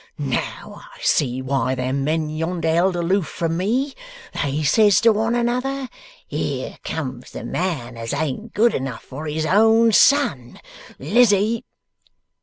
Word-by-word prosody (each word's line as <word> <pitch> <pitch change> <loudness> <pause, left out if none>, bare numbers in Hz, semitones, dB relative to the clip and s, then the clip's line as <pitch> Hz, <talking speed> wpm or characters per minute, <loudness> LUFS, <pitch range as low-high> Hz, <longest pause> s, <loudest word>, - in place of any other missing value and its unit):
Now - - -4
I - - -17
see 130 -3 +1
why 130 -1 0
them 130 +2 -2
men 155 +2 0
yonder 165 +2 -3
held 180 +2 +2
aloof 175 0 0
from 165 +2 -2
me. 245 +10 0 0.4
They 145 +1 -2
says 205 +5 +4
to 230 - +6
one 225 +3 0
another, 250 +3 -1 0.4
"Here - - -4
comes 130 -6 -5
the - - -8
man 140 -10 -3
as 115 0 -5
ain't 160 - -3
good 230 +2 +4
enough 130 -3 -4
for 150 +4 -8
his 155 +1 -2
own 225 +5 +4
son!" 200 - +3 0.4
Lizzie 215 - +2
170 Hz, 140 wpm, -21 LUFS, 140-225 Hz, 0.4 s, to